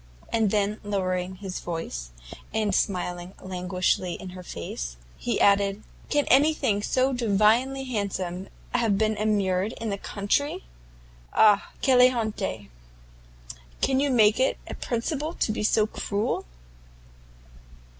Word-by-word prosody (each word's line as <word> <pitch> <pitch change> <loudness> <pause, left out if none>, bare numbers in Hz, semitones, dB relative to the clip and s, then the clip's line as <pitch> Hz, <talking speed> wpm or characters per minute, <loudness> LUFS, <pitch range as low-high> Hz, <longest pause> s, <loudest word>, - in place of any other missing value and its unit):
and 225 -2 +3
then, 210 +1 0
lowering 185 -2 -1
his 190 -1 -6
voice, 165 - -5 0.4
and 215 -2 0
smiling 180 -1 -1
languishingly 180 -1 -1
in 190 - -8
her 180 0 -9
face, 60 - -6 0.2
he - - -2
added, 200 +1 +3 0.3
"Can 290 -1 +2
anything 270 -6 +3
so 260 +5 +1
divinely 240 +4 +2
handsome 195 -6 -3 0.2
have 230 -5 +2
been 215 +1 +1
immured 205 -1 +1
in 225 -2 -4
the 200 - -3
country? 205 +11 -1 0.7
Ah! 210 -2 +5
quelle 255 -2 +6
honte! 210 - -3 1.1
do - - +2
you 280 +2 +2
make 220 -4 +4
it 260 - +2
a - - -7
principle 295 +7 -3
to - - 0
be 215 - -3
so 210 0 +3
cruel?" 210 0 -2
205 Hz, 125 wpm, -26 LUFS, 185-230 Hz, 1.1 s, quelle